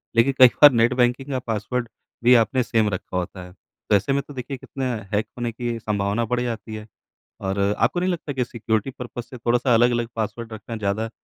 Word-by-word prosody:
लेकिन 120 +4 +4
कई 130 - +11
बार 145 -1 +11
net 120 +1 +3
banking 125 +2 +1
का 130 - 0
पासवर्ड 115 +1 -3 0.4
भी 125 +1 +7
आपने 125 +4 +1
सेम 110 -3 +1
रखा 95 -1 -4
होता 90 +1 -4
है। 90 - -13 0.4
तो - - +5
ऐसे 100 +8 +1
में 140 - +1
तो 145 - -10
देखिए 130 +1 -5
कितना 130 0 -4 0.2
हैक 105 +1 +1
होने 120 -1 -2
की 120 0 -3
संभावना 105 +1 -1
बढ़ 120 +2 -1
जाती 115 -2 -4
है 110 0 -8 0.5
और 95 +1 -2 0.2
आपको 125 +10 +1
नहीं 185 +1 +1
लगता 155 -4 -4
कि 130 -2 -1
सिक्योरिटी-पर्पज़ 120 +2 -3
से 125 +1 -11
थोड़ा-सा 120 +1 +2
अलग-अलग 120 0 +3
पासवर्ड 115 +1 -4
रखना 110 +2 -7
ज़्यादा 110 +1 -2
120 Hz, 205 wpm, -23 LUFS, 110-125 Hz, 0.5 s, कई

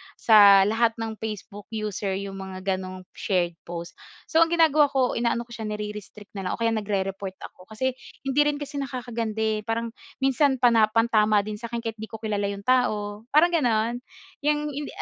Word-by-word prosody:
sa 200 -3 +7
lahat 225 +3 +2
ng 225 -1 -5
Facebook 205 -2 -7
user 210 -2 -2
'yong 195 0 -5
mga 190 -1 -7 0.2
gano'ng 185 0 -8
shared 180 -4 0 0.2
post. 170 0 -7 0.2
So, 320 - +1
ang 330 - +6
ginagawa 320 -3 +4
ko, 265 -3 +1
inaano 235 0 0
ko 235 - -21
siya 225 -2 -5
nirerestrict 210 0 -7
na 190 - -4
lang - - -1
o - - -17
kaya 230 0 +2
nagre-report 195 -3 -2 0.2
ako. 185 - -18
Kasi 260 +4 -1 0.3
hindi 270 +1 0
rin 295 - +1
kasi 290 0 -5
nakakaganda, 235 -5 -3
eh, 220 -1 +1
parang, 230 +1 -2 0.3
minsan 270 +1 +3
pana 235 -3 +4
pantama 215 -2 +3
din 210 0 -6
sa 235 - -6
akin 235 0 -5
kahit 225 -1 -5
'di 220 - -6
ko 220 - -9
kilala 205 -2 -1
'yong 200 0 -5
tao, 215 -3 0
parang 310 +6 +4
gano'n. 240 -7 +1 0.4
'Yang 295 +1 +1
hindi 285 +1 -5
220 Hz, 190 wpm, -25 LUFS, 205-245 Hz, 0.4 s, sa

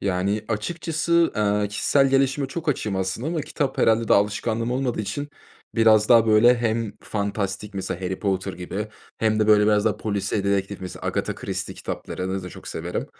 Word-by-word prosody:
Yani, 100 +3 -1
açıkçası, 165 +8 0
eee, 105 -1 +1
kişisel 135 +6 +2
gelişime 135 +1 +2
çok 160 +3 -5
açığım, 105 -8 -1
aslında, 95 +9 -2
ama 165 -2 -1
kitap, 140 -1 -3
herhâlde, 115 0 +3
daha - - +6
alışkanlığım 110 +3 -1
olmadığı 125 -3 -1
için 125 +8 -4 0.5
biraz 110 -2 +5
daha 115 -2 +6
böyle 115 +3 +6
hem 115 -2 -1
fantastik, 100 -1 -3
mesela 95 -1 -4
Harry 95 0 -3
Potter 95 -1 -1
gibi 95 +4 -5 0.3
hem 110 -1 +1
de 110 - +3
böyle 105 -1 +6
biraz 105 0 +3
daha 105 -2 +1
polisiye 100 -1 -2
dedektif, 100 0 -1
mesela 90 -1 -7
Agatha - - -1
Christie - - -5
kitaplarını 95 +1 -4
da 90 - -6
çok - - -11
severim. 85 +2 -4
105 Hz, 175 wpm, -24 LUFS, 100-120 Hz, 0.5 s, daha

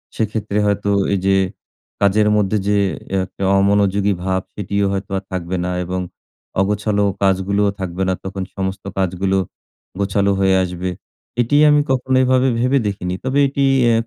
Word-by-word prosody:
সেক্ষেত্রে 105 -1 -2
হয়তো 100 0 0 0.2
এই 100 - +1
যে 95 0 +4 0.7
কাজের 105 +2 +3
মধ্যে 105 +1 +1
যে 105 0 +3 0.5
একটা 95 - -8 0.2
অমনোযোগী 100 0 +2
ভাব 95 0 0
সেটিও 100 0 -1
হয়তো 95 0 -4
আর 95 - -5
থাকবে 90 0 -3
না 90 - -1
এবং 90 +1 -3 0.6
অগোছালো 105 +1 0 0.2
কাজগুলোও 100 +1 +2
থাকবে 95 0 -3
না - - +2
তখন 95 0 -4
সমস্ত 95 0 -3
কাজগুলো 95 +1 0 0.6
গোছালো 100 0 +1
হয়ে 95 -1 +3
আসবে। 90 0 -3 0.5
এটিই 145 +5 +3
আমি 150 0 +5
কখনো 130 0 +1
এভাবে 130 +1 +3
ভেবে 130 +3 +2
দেখিনি। 90 -3 -3
তবে 135 +2 0
এটি 140 +1 -1 0.3
এ - - +3
100 Hz, 150 wpm, -19 LUFS, 95-105 Hz, 0.7 s, আমি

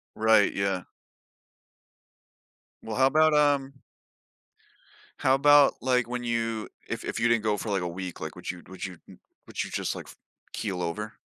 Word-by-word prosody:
Right, 110 -1 +4
yeah. 100 -2 -1 2.0
Well, 110 -1 -5
how 130 0 +5
about, 155 +2 +4
um 145 -2 +2 1.4
How 130 - +3
about, 145 +1 +6
like, 125 -2 +1
when 125 0 -4
you, 115 -2 -2 0.2
if - - -4
if - - -3
you 120 - +3
didn't 115 -2 +2
go 105 -1 +2
for 105 - -5
like 100 -2 0
a 90 - -2
week, 90 +1 -6
like, 80 +1 -6
would 90 - -5
you, 90 - -6
n - - -16
would 95 0 -7
you 90 -2 -6 0.5
would - - -4
you - - -8
just, - - -2
like, - - -9 0.4
keel 95 -4 -3
over? 105 +6 -4
110 Hz, 170 wpm, -27 LUFS, 95-130 Hz, 2.0 s, about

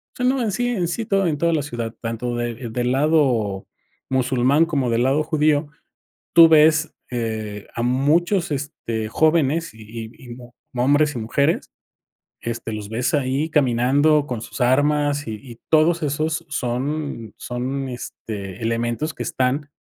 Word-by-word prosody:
sea, 250 - -1
no 260 +1 +2
en 220 -3 0
sí 245 +5 -1
en 205 -8 0
sí, 225 +6 -3
todo 195 -2 +1
en 155 -3 0
toda 170 +3 +1
la 155 - +1
ciudad, 120 -5 -4
tanto 115 +1 -3
de, 120 0 -4
del 120 +2 -1
lado 130 -9 +1 0.4
musulmán 130 +3 +3
como 140 -7 -1
del 115 +1 +2
lado 135 +4 +2
judío, 150 -1 +1 0.6
tú 165 -1 +9
ves, 155 0 +4 0.2
eh, 110 -4 -4
a 115 - -2
muchos, 155 - +2
este, 115 -6 -3
jóvenes 160 +1 +2
y 110 - -14 0.2
y 110 - -12
y 125 - -14
mu 120 -1 -13 0.2
hombres 145 +4 +3
y - - -2
mujeres, 140 +8 0 0.7
este, 115 -1 -4
los 105 -1 -5
ves 120 - -1
ahí 140 +2 0
caminando 145 +2 +3
con 125 -5 -4
sus 120 - -5
armas 145 +3 +2
y - - -3
y 115 +1 -12
todos 165 +2 +3
esos 155 +3 -1
son 135 -2 -3
son, 130 +2 -4
este, 105 -5 -7
elementos 120 +6 -1
que 125 - -6
están 130 +5 -1
135 Hz, 155 wpm, -22 LUFS, 120-155 Hz, 0.7 s, tú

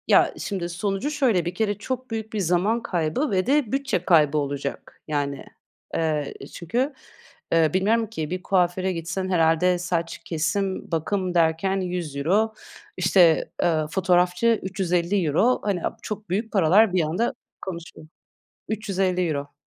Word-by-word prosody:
Ya, - - +5
şimdi 185 -4 -3
sonucu 195 +8 -2
şöyle: 240 - +2
Bir 175 +1 -3
kere 205 -1 0
çok 255 +3 -5
büyük 220 -1 -4
bir 215 - -1
zaman 190 +6 +1
kaybı 175 - -1
ve 185 -1 +1
de 270 -3 +2
bütçe 270 -10 -1
kaybı 155 -4 +4
olacak. 140 -1 -4
Yani, 145 -2 -2 0.5
eee, 155 -3 -1 0.2
çünkü, 245 - -1 0.6
eee, 165 -2 +4
bilmiyorum 220 +4 +2
ki, 160 -8 -4
bir 185 +1 -4
kuaföre 185 0 +1
gitsen 175 +3 -3
herhâlde 175 +1 +3
saç, 175 -2 -2
kesim, 180 +5 -2
bakım 180 +3 -1
derken 170 +3 +2
€100, 180 +4 0 0.4
işte, 180 -3 +4
ııı, 155 -3 +1
fotoğrafçı 180 +5 +2
€350 185 - +1
Hani, 195 -4 -1
aaa, - - -3
çok 215 -2 -6
büyük 215 +5 -1
paralar 195 +2 +5
bir 185 - +3
anda 180 - 0 0.3
konuşuyor 170 -3 -8 0.6
€350 185 -8 -1
180 Hz, 135 wpm, -24 LUFS, 165-205 Hz, 0.6 s, Ya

